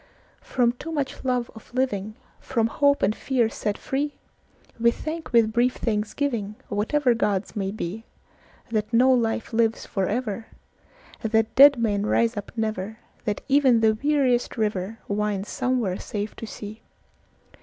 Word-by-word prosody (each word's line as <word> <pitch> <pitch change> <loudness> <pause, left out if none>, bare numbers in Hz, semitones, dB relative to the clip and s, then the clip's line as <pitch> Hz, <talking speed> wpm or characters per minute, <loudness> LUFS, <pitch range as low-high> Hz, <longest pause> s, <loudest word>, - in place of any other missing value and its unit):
From 245 -2 +1
too 275 +7 -8
much 285 -4 -3
love 250 -2 0
of 220 - -14
living, 215 -5 -1 0.2
From 230 -4 0
hope 285 +5 +2
and 205 +3 +2
fear 245 -4 +1
set 210 -2 -3
free, 285 +2 -2 0.6
We 235 +1 +5
thank 320 +6 -5
with 230 -2 +4
brief 245 +2 +2
thanksgivingWhatever 225 +2 0
gods 205 -3 -1
may 195 -2 -1
beThat 215 +2 -6
no 250 +3 +5
life 230 -2 0
lives 225 -1 +1
for 190 -2 -1
ever; 220 -1 -2 0.7
That 220 0 +1
dead 280 +1 +8
men 210 -3 0
rise 230 +1 +2
up 205 - -6
never; 220 -2 -2 0.3
That 210 -3 -1
even 270 -5 +4
the 220 -1 +5
weariest 260 0 +1
riverWinds 210 -1 -2
somewhere 240 -8 0
safe 210 0 -4
to 225 - -6
sea. 215 +1 -8
225 Hz, 135 wpm, -25 LUFS, 210-255 Hz, 0.7 s, dead